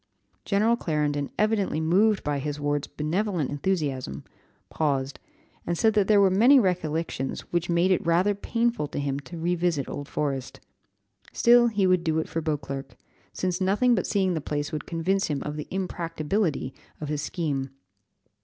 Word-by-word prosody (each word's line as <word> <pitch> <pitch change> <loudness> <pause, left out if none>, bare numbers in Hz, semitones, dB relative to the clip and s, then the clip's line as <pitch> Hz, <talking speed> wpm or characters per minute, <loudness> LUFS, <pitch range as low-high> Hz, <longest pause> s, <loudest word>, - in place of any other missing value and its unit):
General 215 +3 +3
Clarendon, 150 -7 -1
evidently 210 -6 +1
moved 195 +7 +3
by 145 -1 -1
his 145 +1 -4
ward's 145 0 -1
benevolent 170 0 -1
enthusiasm, 145 - -2 0.4
paused 140 -3 -1 0.5
and 170 0 0
said 220 +4 +3
that 205 -2 +2
there 210 -2 +5
were 195 -1 +5
many 240 +9 +6
recollections 165 - -1
which 175 0 0
made 170 +2 +3
it 185 - +2
rather 175 +5 +3
painful 230 -4 -1
to - - -7
him 140 -1 -2
to 170 +4 -10
revisit 170 -3 0
Old 145 0 -6
Forest. 135 -4 -3 0.7
Still 240 0 +6
he 210 -4 +1
would 185 -2 +3
do 160 -2 0
it 160 - -1
for 165 - -3
Beauclerc, 140 -3 -4 0.4
since 185 0 -2
nothing 210 +7 +3
but 190 - 0
seeing 190 -2 +1
the 160 - -2
place 145 +1 -3
would 155 -2 -5
convince 185 +4 0
him 145 -2 -1
of 150 0 -4
the 150 - -6
impracticability 170 -4 -2 0.3
of 150 - -5
his 150 -1 -2
scheme. 145 -5 -2
165 Hz, 165 wpm, -26 LUFS, 145-195 Hz, 0.7 s, many